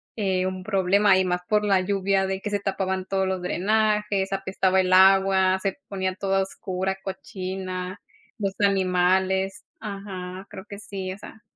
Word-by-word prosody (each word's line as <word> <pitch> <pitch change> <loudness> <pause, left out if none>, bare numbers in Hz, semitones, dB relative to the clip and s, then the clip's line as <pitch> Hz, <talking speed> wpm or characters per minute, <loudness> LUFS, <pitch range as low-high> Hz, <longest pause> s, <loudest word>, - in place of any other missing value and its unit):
eh, 190 -4 0
un 185 0 -5
problema, 195 0 +3
y - - +3
más 180 0 -1
por 210 -1 +2
la 195 -2 +3
lluvia 195 0 +1
de 190 0 -3
que 210 - -3
se 205 0 0
tapaban 190 -1 -2
todos 190 0 0
los 185 -1 -2
drenajes, 210 +1 +1
apestaba 190 -1 +1
el 185 0 -1
agua, 190 0 +5
se 195 -1 -2
ponía 190 -1 -2
todo 195 -1 -2
a - - +3
oscura, 190 0 -3
cochina, 185 -1 -5 0.4
los 195 -2 -1
animales. 190 -1 +2 0.2
Ajá, 195 -3 -7
creo 195 -1 -9
que 200 -1 -8
sí, 190 -3 -5
o - - -10
sea 220 +1 -12
190 Hz, 165 wpm, -25 LUFS, 185-200 Hz, 0.4 s, agua